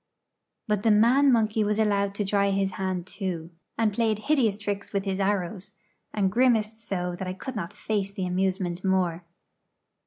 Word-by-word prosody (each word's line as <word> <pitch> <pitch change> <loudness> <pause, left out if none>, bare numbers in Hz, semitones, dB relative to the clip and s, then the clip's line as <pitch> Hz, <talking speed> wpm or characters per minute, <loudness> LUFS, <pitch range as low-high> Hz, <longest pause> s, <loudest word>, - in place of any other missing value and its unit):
But 210 -2 +1
the 225 - +2
man 240 +7 +5
monkey 220 -2 +2
was 210 0 0
allowed 200 -2 +1
to 205 - -1
try 200 0 +2
his 195 0 0
hand 185 -2 -3
too, 180 -4 -5 0.3
and 220 -2 +2
played 220 -1 +1
hideous 240 -4 +1
tricks 205 -1 -4
with 200 0 -1
his 195 0 -2
arrows, 195 0 -1 0.4
and 195 -3 +1
grimaced 225 -2 +2
so 180 -5 -3
that 190 - -4
I 185 - -3
could 255 +7 -7
not 180 -6 -4
face 200 -2 -2
the 195 -2 -3
amusement 185 -1 -1
more. 185 -3 +1
200 Hz, 175 wpm, -26 LUFS, 190-215 Hz, 0.4 s, man